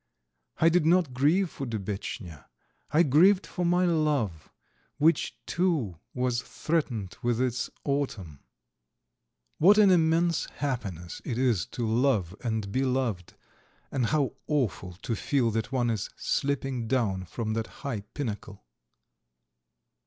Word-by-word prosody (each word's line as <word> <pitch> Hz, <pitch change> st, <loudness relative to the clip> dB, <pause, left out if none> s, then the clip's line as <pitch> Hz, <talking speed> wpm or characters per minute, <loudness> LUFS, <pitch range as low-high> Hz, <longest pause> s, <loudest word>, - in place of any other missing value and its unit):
I 165 Hz, -, +5 dB
did 175 Hz, 0 st, +3 dB
not 165 Hz, -4 st, +3 dB
grieve 160 Hz, +8 st, +2 dB
for 135 Hz, -, -5 dB
Dubetchnya. 100 Hz, -, -5 dB, 0.4 s
I 155 Hz, +3 st, +4 dB
grieved 180 Hz, +7 st, +5 dB
for 180 Hz, -, -4 dB
my 175 Hz, +1 st, +3 dB
love 150 Hz, -, 0 dB, 0.5 s
which, 160 Hz, +3 st, +2 dB
too, 155 Hz, -, 0 dB, 0.2 s
was 125 Hz, -1 st, 0 dB
threatened 125 Hz, -, -2 dB
with 120 Hz, -1 st, 0 dB
its 125 Hz, -1 st, 0 dB
autumn. 110 Hz, -, -2 dB, 1.2 s
What 200 Hz, +6 st, +7 dB
an 205 Hz, -3 st, +7 dB
immense 165 Hz, -1 st, +3 dB
happiness 100 Hz, -, -4 dB
it 120 Hz, -, -3 dB
is 120 Hz, -9 st, +1 dB
to 120 Hz, -, 0 dB
love 110 Hz, -6 st, +1 dB
and 110 Hz, -4 st, -2 dB
be 130 Hz, +5 st, +1 dB
loved, 125 Hz, -9 st, -1 dB, 0.6 s
and 125 Hz, -4 st, 0 dB
how 145 Hz, -1 st, +1 dB
awful 105 Hz, -, -1 dB
to 115 Hz, -, -1 dB
feel 120 Hz, +1 st, +1 dB
that 110 Hz, +3 st, -2 dB
one 120 Hz, -3 st, +1 dB
is 110 Hz, -4 st, -3 dB
slipping 135 Hz, -4 st, -1 dB
down 105 Hz, -7 st, 0 dB
from 110 Hz, +5 st, -3 dB
that 115 Hz, 0 st, -2 dB, 0.2 s
high 130 Hz, -6 st, -1 dB
pinnacle! 105 Hz, -, -6 dB
125 Hz, 130 wpm, -28 LUFS, 110-155 Hz, 1.2 s, What